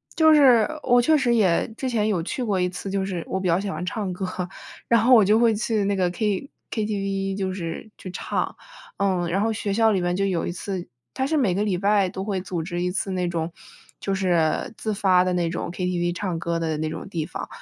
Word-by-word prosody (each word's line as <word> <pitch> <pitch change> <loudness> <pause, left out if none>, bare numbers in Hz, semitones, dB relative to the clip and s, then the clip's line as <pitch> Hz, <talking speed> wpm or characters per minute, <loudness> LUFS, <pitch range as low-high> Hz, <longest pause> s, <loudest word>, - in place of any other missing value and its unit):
就 315 -1 +6
是 255 -7 +6 0.2
我 245 -1 +5
确 310 +5 +4
实 245 -3 +2
也 190 -7 +3
之 260 +2 -3
前 220 -3 +1
有 195 -6 +1
去 245 +9 -3
过 200 -5 0
一 180 - +1
次， 185 +2 -6
就 195 -1 0
是 180 -4 -4
我 190 - -2
比 185 - -2
较 170 +1 +3
喜 200 - -4
欢 160 +1 -4
唱 195 0 -3
歌， 185 +1 -3 0.6
然 230 -2 +4
后 250 +3 +6
我 215 -4 +6
就 210 +3 +4
会 230 -2 +4
去 220 -1 0
那 200 - +1
个 185 -2 +1
K 210 +5 -1 0.2
KTV 195 -3 -2
就 190 -1 -2
是 175 +4 -5
去 185 - -8
唱， - - -2 0.4
嗯， 185 -3 +1
然 195 +3 +1
后 225 - +1
学 210 -1 -3
校 225 0 +4
里 190 - +1
面 175 0 0
就 195 +1 +1
有 180 -4 0
一 - - -2
次 180 0 -5 0.3
它 265 - -1
是 310 +3 +1
每 210 -10 +2
个 205 - +1
礼 200 -4 0
拜 200 0 +2
都 190 +1 -5
会 195 -3 -1
组 180 -3 -3
织 175 +1 -4
一 180 0 0
次 195 - -2
那 180 -1 -1
种 165 -1 -2 0.5
就 195 - -1
是 175 -2 +1
自 215 -1 -2
发 185 -3 +4
地 185 - 0
那 175 -2 0
种 170 - -4
Ktv 175 -1 -1
唱 185 -2 -3
歌 170 0 -1
的 160 -1 -1
那 155 +1 -2
种 160 - -6
地 170 -5 -3
方， - - -6
195 Hz, 270 characters per minute, -24 LUFS, 180-215 Hz, 0.6 s, 就